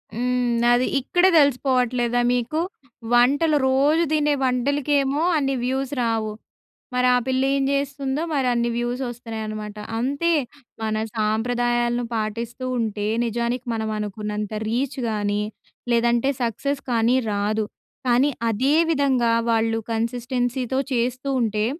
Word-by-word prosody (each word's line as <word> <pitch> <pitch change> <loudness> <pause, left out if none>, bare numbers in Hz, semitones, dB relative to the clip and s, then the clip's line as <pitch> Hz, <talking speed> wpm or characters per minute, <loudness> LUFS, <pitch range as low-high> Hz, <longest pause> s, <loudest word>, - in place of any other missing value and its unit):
హ్మ్. 245 0 0
అది 245 +1 +3
ఇక్కడే 355 +8 +3
తెలిసిపోవట్లేదా 250 -3 +2
మీకు? 250 +5 -1 0.5
వంటలు 285 +6 +4
రోజు 285 +5 +3
తినే 300 -1 +2
వంటలకేమో 280 +2 +1 0.2
అన్ని 275 -2 0
వ్యూస్ 265 +2 -1
రావు. 225 -2 0 0.6
మరి 250 0 +2
ఆ - - +4
పిల్ల 260 0 +1
ఏం 275 - +1
జేస్తుందో 280 0 -1
మరి 275 -4 +1
అన్ని 235 0 +1
వ్యూస్ 240 +2 -2
వస్తున్నాయనమాట. 220 -3 -6 0.2
అంతే 280 +8 0 0.5
మన 220 -1 -1 0.2
సాంప్రదాయాలను 240 +2 0
పాటిస్తూ 230 +3 -3
ఉంటే 210 -2 -2 0.2
నిజానికి 235 +2 -2
మనం 220 -1 -2
అనుకున్నంత 210 0 -4 0.2
రీచ్ 255 +4 -1
గానీ, 205 -1 -1 0.5
లేదంటే 235 +2 +2
సక్సెస్ 245 +5 -1
కానీ 230 +1 +3 0.2
రాదు. 210 +2 0 0.4
కానీ 250 +4 +4 0.2
అదే 260 +7 +1 0.2
విధంగా 270 -6 +2 0.2
వాళ్ళు 225 0 +2
కన్సిస్టెన్సీతో 245 +2 -1
చేస్తూ 250 +3 -1
ఉంటే, 215 -2 0
245 Hz, 115 wpm, -23 LUFS, 225-270 Hz, 0.6 s, వంటలు